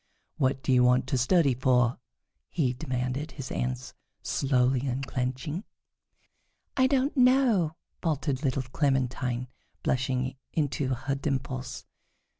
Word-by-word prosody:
"What 135 0 +1
do 135 - +2
you 125 -1 +5
want 125 +1 +4
to 130 - +1
study 140 +1 +4
for?" 125 -1 +2 0.5
he 135 -8 +1
demanded, 130 +2 -3
his 135 -3 -6
hands 125 0 -3 0.3
slowly 130 -1 +1
unclenching. 130 - -2 1.1
"I 260 -1 +4
don't 270 +2 +1
know," 250 - +4 0.3
faltered 145 -5 -1
little 135 -1 0
Clementine, 130 -2 0 0.4
blushing 130 0 0 0.2
into 140 -3 0
her 130 +3 -2
dimples. 135 -2 -3
130 Hz, 110 wpm, -28 LUFS, 125-150 Hz, 1.1 s, you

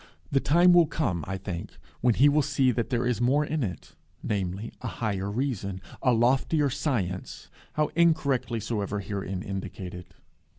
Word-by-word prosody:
The 135 - +4
time 175 +6 +5
will 175 -2 +6
come, 105 - -1
I 95 0 -3
think, 95 -3 -6 0.2
when 120 -2 +3
he 140 - +6
will 150 +1 +4
see 140 -2 +2
that 115 -1 -2
there 125 -2 0
is 120 -2 0
more 140 +5 +3
in 155 +1 -2
it, 90 -7 -6 0.3
namely, 100 +1 -2
a - - -4
higher 100 -3 -2
reason, 105 -5 -2 0.2
a 125 - +3
loftier 135 +5 +2
science, 100 - -3 0.2
how 150 0 0
incorrectly 140 -8 +2
soever 105 -2 -2
herein 95 -2 -4
indicated. 95 -2 -6
120 Hz, 160 wpm, -27 LUFS, 95-140 Hz, 0.3 s, will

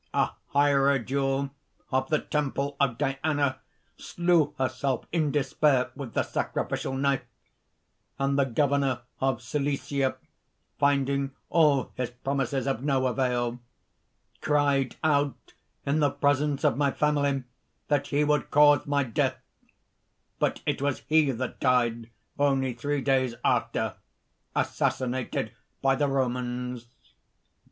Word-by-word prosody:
A - - +2 0.2
hierodule 140 -1 +2 0.4
of 130 +1 0
the 155 - +3
temple 140 -1 -2
of 130 -5 +2
Diana, 135 0 0 0.4
slew 170 -4 +1
herself 130 -1 -1
in 160 -3 +1
despair 135 -1 +2
with 135 -6 -7
the - - +2
sacrificial - - -2
knife; 140 0 +1 1.0
and 135 0 +1
the 140 -1 +3
governor 140 -1 +1 0.2
of 130 -3 0
Cilicia, 140 0 -1 0.6
finding 140 -1 +1 0.2
all 150 -6 +3
his 125 -2 -1
promises 135 +1 -2
of 135 -4 -1
no 135 -2 +1
avail, 125 -2 0 0.8
cried 145 -3 +2
out 145 -4 0 0.3
in 140 +3 +1
the 145 -2 +4
presence 145 0 +1
of - - +3
my 145 -1 +3
family 145 -2 +1 0.4
that 145 -1 +1
he 145 +1 +1
would 150 -1 +1
cause 145 -1 +5
my 145 0 +2
death; 115 -4 0 1.0
but - - 0
it - - -1
was 145 -1 -1
he 155 -2 +4
that 130 0 -3
died 120 -3 +1 0.3
only 135 -3 +2
three 145 +4 -2
days 130 -3 +1
after, - - 0 0.6
assassinated 130 -1 -1 0.3
by 135 0 +3
the 145 +2 +1
Romans." 125 -2 -2
140 Hz, 120 wpm, -27 LUFS, 130-145 Hz, 1.0 s, cause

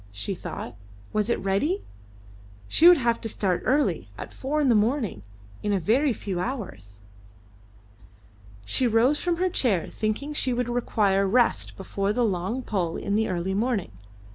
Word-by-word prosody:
she 105 - -4
thought. 180 - -7 0.4
Was 215 +1 +1
it 235 - +1
ready? 200 - 0 0.8
She 330 - +5
would 355 -1 +9
have 235 -3 0
to 225 - -3
start 190 -4 0
early 285 +3 +1
at - - -8
four 290 +3 -2
in 290 - +2
the 245 - +5
morning, 220 - +1 0.4
in 205 - 0
a 195 - +2
very 255 - +2
few 195 -5 -4
hours. 105 - -6 1.6
She 250 - +1
rose 240 +6 +3
from 350 -1 0
her 370 +2 +1
chair, 240 - +1
thinking 225 +8 -3
she 260 -4 0
would 245 0 -1
require 205 -5 +1
rest 240 +4 +1
before 195 +1 -2
the 245 +1 +2
long 200 +6 -2
pull 180 -8 -2
in 200 - -3
the 220 +1 +1
early 180 +1 -2
morning. 210 - -1
220 Hz, 165 wpm, -25 LUFS, 195-255 Hz, 1.6 s, would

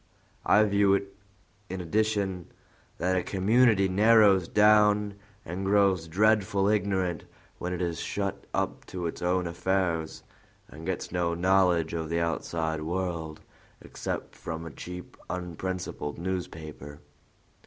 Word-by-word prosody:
I 105 - +6
view 100 -1 +3
it, 100 0 -4 0.5
in 95 +1 -4
addition, 100 -1 -1 0.5
that 90 +3 0
a 90 - +2
community 105 +2 +3
narrows 100 -2 +5
down 105 -1 +4 0.3
and 90 +4 -4
grows 95 -4 +3
dreadful 100 +2 +2
ignorant 95 -4 0 0.3
when 90 - -3
it 90 0 -2
is 85 -3 -2
shut - - -3
up - - -2
to 90 -2 -5
its 85 - -4
own 90 +1 +1
affairs, 85 -2 -1 0.4
and 80 +2 -10
gets 95 - -3
no 85 -1 0
knowledge 90 -2 +2
of 80 -2 -3
the 85 0 0
outside 80 -1 -2
world 85 -2 -3 0.4
except - - -6
from 80 0 -6
a 80 - -7
cheap, 90 +5 -9
unprincipled 90 -3 -4
newspaper. 80 -5 -6
90 Hz, 125 wpm, -28 LUFS, 85-100 Hz, 0.5 s, I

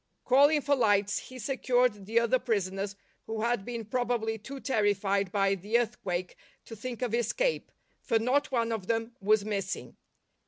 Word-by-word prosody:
Calling 285 +4 +5
for 285 +1 +2
lights 205 -4 +2
he 255 - -11
secured 245 -4 0
the 230 +2 +3
other 235 +2 +2
prisoners 200 -4 -2 0.3
who 220 -1 -3
had 235 -3 +1
been 235 0 -5
probably 230 -1 -1
too 270 +6 -8
terrified 205 -6 +1
by 195 -1 +2
the 205 +5 0
earthquake 185 -6 -2 0.3
to 225 - -9
think 245 +2 -5
of 240 -3 -2
escape, 240 - 0 0.3
for 230 - +1
not 255 +6 +1
one 230 -2 +1
of 210 -5 -3
them 225 0 -1
w'as 210 +1 +3
missing. 200 -3 -3
225 Hz, 160 wpm, -29 LUFS, 205-245 Hz, 0.3 s, Calling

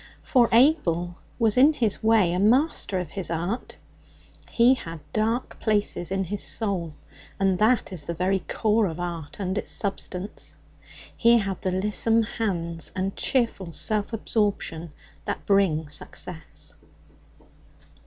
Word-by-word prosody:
For 245 -3 +3
Abel 175 - +3 0.2
was 225 -1 +2
in 285 +5 +7
his 230 -8 0
way 220 -6 +4
a 180 - 0
master 230 - +2
of 180 -4 -4
his 190 -3 -4
art; 175 +8 -3 0.7
he 240 +2 +5
had 165 -10 -6
dark 225 +3 -1
places 205 -5 0
in 195 0 0
his 200 +2 -3
soul, 180 -8 -1 0.4
and 190 -2 +2
that 220 -2 +2
is 155 -5 -5
the 170 - -4
very 190 +3 +1
core 215 +3 +1
of 165 0 -6
art 170 -3 -5
and 190 +1 -1
its - - -5
substance. 195 -1 -4 0.6
He 235 0 +5
had 195 -4 -2
the 185 - 0
lissom 210 +4 +2
hands 170 -7 -3
and 195 0 -2
cheerful 230 -9 0
self 210 +6 -1
absorption 205 -7 -1 0.3
that - - -4
bring 185 -6 +2
success. 160 +2 -5
195 Hz, 135 wpm, -25 LUFS, 175-225 Hz, 0.7 s, in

